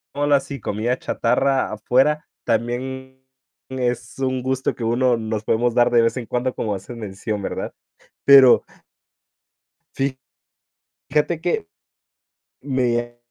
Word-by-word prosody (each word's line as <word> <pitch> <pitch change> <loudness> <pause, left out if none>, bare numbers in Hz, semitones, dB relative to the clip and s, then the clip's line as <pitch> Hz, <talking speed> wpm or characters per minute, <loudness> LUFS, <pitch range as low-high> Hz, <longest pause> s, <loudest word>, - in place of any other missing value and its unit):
Digámoslo 145 0 +3
así, 140 -1 -2
comida 115 +5 -1
chatarra 130 +3 +1
afuera, 135 +8 +1 0.2
también 130 +3 -3 0.4
es 125 -2 -3
un 130 -1 -1
gusto, 130 0 -1
que 120 - -6
uno 120 +1 +2
nos 110 -1 -3
podemos 120 +2 +1
dar, 120 0 +4
de 120 -1 +4
vez 115 - +1
en 120 - -5
cuando, 125 +2 -1
como 105 -2 -2
haces 100 +5 -8
mención, 105 -1 -5
¿verdad? - - -4 0.5
Pero 135 -3 +8 1.3
fi 135 -1 -1 0.9
fíjate 155 +3 +1
que 170 - -1 0.9
me 120 -3 -1
125 Hz, 120 wpm, -21 LUFS, 115-130 Hz, 1.3 s, Pero